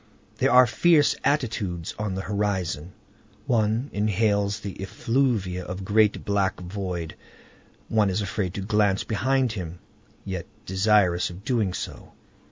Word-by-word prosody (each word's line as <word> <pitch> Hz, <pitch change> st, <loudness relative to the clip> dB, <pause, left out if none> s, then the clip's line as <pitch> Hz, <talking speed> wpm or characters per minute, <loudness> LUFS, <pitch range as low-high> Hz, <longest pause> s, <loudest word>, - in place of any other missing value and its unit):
There -, -, +2 dB
are 125 Hz, 0 st, +8 dB
fierce 150 Hz, +4 st, +4 dB
attitudes 110 Hz, -, -1 dB
on 105 Hz, -3 st, -2 dB
the 95 Hz, -, -2 dB
horizon. 95 Hz, -5 st, -2 dB, 0.5 s
One 115 Hz, +3 st, +1 dB
inhales 105 Hz, 0 st, +1 dB
the 100 Hz, -2 st, -7 dB
effluvia 105 Hz, -4 st, 0 dB
of 90 Hz, +1 st, -5 dB
the 95 Hz, -, -7 dB
great 105 Hz, +1 st, +2 dB
black 100 Hz, -2 st, 0 dB
void. 90 Hz, -3 st, -5 dB, 0.7 s
One 105 Hz, -3 st, +2 dB
is 95 Hz, +2 st, 0 dB
afraid 100 Hz, -2 st, -2 dB
to 100 Hz, -, -3 dB
glance 100 Hz, -1 st, +2 dB
behind 130 Hz, +3 st, +1 dB
him, 90 Hz, -5 st, -6 dB, 0.5 s
yet 95 Hz, -3 st, -4 dB, 0.2 s
desirous 95 Hz, -2 st, +3 dB
of 90 Hz, +3 st, -10 dB
doing 115 Hz, -7 st, +1 dB
so. -, -, -7 dB
100 Hz, 135 wpm, -25 LUFS, 95-110 Hz, 0.7 s, are